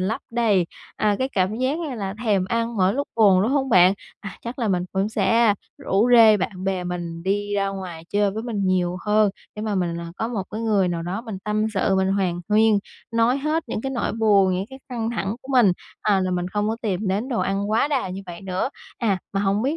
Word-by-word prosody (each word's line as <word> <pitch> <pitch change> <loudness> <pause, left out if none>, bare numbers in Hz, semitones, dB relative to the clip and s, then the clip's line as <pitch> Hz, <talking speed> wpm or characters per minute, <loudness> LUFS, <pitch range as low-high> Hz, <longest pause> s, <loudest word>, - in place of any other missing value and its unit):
lấp 200 +5 -1
đầy, 215 -7 +2 0.3
à, 210 -1 +2
cái 260 - 0
cảm 200 -3 0
giác 260 +5 0
như 310 -7 -4
là 195 -3 -4
thèm 200 -4 +2
ăn 230 +3 -1
mỗi 190 +1 +3
lúc 285 +1 -2
buồn, 195 -4 +5
đúng 225 - +1
hông 270 -1 +1
bạn? 185 -3 +6 0.3
À, 195 -2 -8
chắc 235 +3 -6
là 230 -3 0
mình 180 -2 +1
vẫn 195 +2 0
sẽ 220 +1 +3 0.2
rủ 210 +5 +1
rê 220 -3 +8
bạn 185 0 -4
bè 190 -2 -1
mình 170 -1 -5
đi 205 +2 -1
ra 195 -1 +1
ngoài 180 -4 -6
chơi 205 -1 +2
với 220 +3 -5
mình 225 -4 -3
nhiều 180 -1 +1
hơn. 210 -1 +4 0.3
Để 210 - -4
mà 215 -2 -1
mình, 170 -2 -1
à, 170 0 -7
có 225 - -2
một 220 -5 -2
cái 220 +1 -4
người 205 -5 +2
nào 170 -1 -2
đó 180 +5 -3
mình 220 -5 -6
tâm 215 +1 0
sự, 190 0 +2
mình 190 0 +2
hàn 180 -3 0
huyên, 215 0 +4 0.3
nói 230 +3 +2
hết 305 +3 0
những - - -3
cái 270 - -3
nỗi 250 -3 -1
buồn, 200 -4 +3
những 190 +2 -2
cái 265 - -10
căng 235 -3 -2
thẳng 210 -1 -2
của 265 - -15
mình, 235 -8 +5 0.3
à, 200 -3 +3
là 185 0 0
mình 180 0 -1
không 205 +2 -1
có 225 - -1
tìm 200 -1 -1
đến 205 +7 -1
đồ 240 -4 -1
ăn 200 +2 -1
quá 225 +6 +2
đà 270 -9 0
như 190 +2 -6
vậy 170 -1 -8
nữa. 190 +4 -2 0.3
À, 205 -6 +1
mà 195 - 0
hổng 200 +2 +1
biết 285 +5 0
205 Hz, 245 wpm, -23 LUFS, 190-230 Hz, 0.3 s, rê